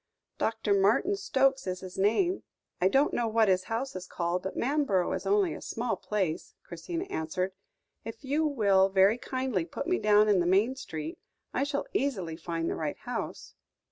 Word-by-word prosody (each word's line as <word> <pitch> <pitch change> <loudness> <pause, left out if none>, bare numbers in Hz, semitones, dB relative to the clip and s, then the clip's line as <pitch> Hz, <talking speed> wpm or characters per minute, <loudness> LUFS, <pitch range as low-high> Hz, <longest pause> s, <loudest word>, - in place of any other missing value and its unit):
"Doctor 225 -2 0
Martin 210 - +3
Stokes 270 - +1
is 185 0 -3
his 185 -1 -8
name; 345 - +2 0.4
I 185 - +5
don't 270 +9 +3
know 240 -1 0
what 220 0 +3
his 185 -1 +2
house 235 +3 -3
is 180 -1 -6
called, 175 +1 -2
but 190 - -5
Manborough 255 -9 +1
is 190 +1 -5
only 195 -4 +3
a - - -8
small 235 +1 -2
place," 190 -7 -3
Christina 330 - -5
answered. 180 +4 -2 0.5
"If 225 +2 -8
you 290 +4 +1
will 200 -8 +3
very 195 +4 +4
kindly 255 -9 -1
put 165 - -6
me 365 +1 +1
down 210 0 +5
in 205 -3 +4
the 175 - +1
main 205 +8 +3
street, 160 - -6 0.3
I 265 - +1
shall 285 0 -2
easily 190 - -1
find 165 0 -3
the - - 0
right 155 -2 -3
house." - - -5
205 Hz, 180 wpm, -29 LUFS, 185-260 Hz, 0.5 s, I